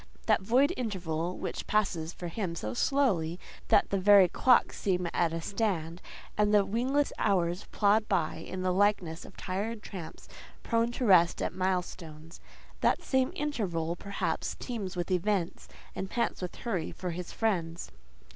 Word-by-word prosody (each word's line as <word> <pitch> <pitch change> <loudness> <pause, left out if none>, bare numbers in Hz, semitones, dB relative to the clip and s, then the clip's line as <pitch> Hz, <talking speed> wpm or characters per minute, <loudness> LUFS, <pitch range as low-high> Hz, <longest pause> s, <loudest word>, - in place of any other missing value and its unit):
That - - +3
void 255 - +3
interval 180 -7 -3
which - - -5
passes 175 -6 0
for 180 - -7
him 170 -1 -3
so 110 -8 -4
slowly 180 - +1 0.3
that - - +3
the 200 - +1
very 195 -1 +7
clocks 250 +7 +3
seem 180 -3 0
at 170 -2 +2
a 165 0 -3
stand, 180 -4 -2 0.3
and 210 0 +2
the 205 -2 +5
wingless 255 +8 0
hours 180 -2 +1
plod 210 +1 +3
by 175 -6 0
in 185 +3 -6
the 185 -1 +1
likeness 185 -4 +1
of - - -14
tired 210 +4 -3
tramps 180 -5 -9 0.4
prone 230 +1 +1
to 250 - -2
rest 175 -4 +5
at - - -2
milestones—that 175 -3 -3
same 260 -1 +1
interval, 180 - -2
perhaps, 200 +3 -3
teems 205 -7 -5
with 175 +1 -3
events, 185 -1 0 0.3
and 190 - -4
pants 235 - -1
with 180 - -5
hurry 190 -9 -3
for 180 -1 -5
his 175 +1 -6
friends. 175 -7 -2
185 Hz, 155 wpm, -30 LUFS, 170-215 Hz, 0.4 s, very